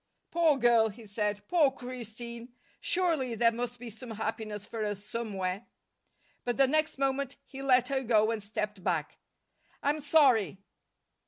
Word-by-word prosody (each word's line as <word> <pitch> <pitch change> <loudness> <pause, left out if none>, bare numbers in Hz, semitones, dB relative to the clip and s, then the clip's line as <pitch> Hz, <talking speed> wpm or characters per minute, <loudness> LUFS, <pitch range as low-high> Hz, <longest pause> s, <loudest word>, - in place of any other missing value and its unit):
"Poor 330 -4 +4
girl!" 235 -3 +4
he 220 +2 -12
said. 205 0 -2
"Poor 325 -6 +4
Christine! 240 -1 -7 0.2
Surely 325 -10 +1
there 230 +1 +4
must 240 +1 -4
be 240 -1 -8
some 230 +3 -10
happiness 220 -2 -4
for 225 -2 -4
us 205 -1 -3
somewhere." 200 -3 -3 0.8
But 245 -1 -1
the 275 - +6
next 310 +3 +1
moment 275 0 0
he 270 -1 -9
let 260 -2 +4
her 270 -1 0
go 220 -3 +3
and 225 -2 -2
stepped 210 -1 -4
back. 165 -6 -1 0.6
"I'm 290 +2 +1
sorry." 270 - +4
235 Hz, 150 wpm, -30 LUFS, 210-270 Hz, 0.8 s, the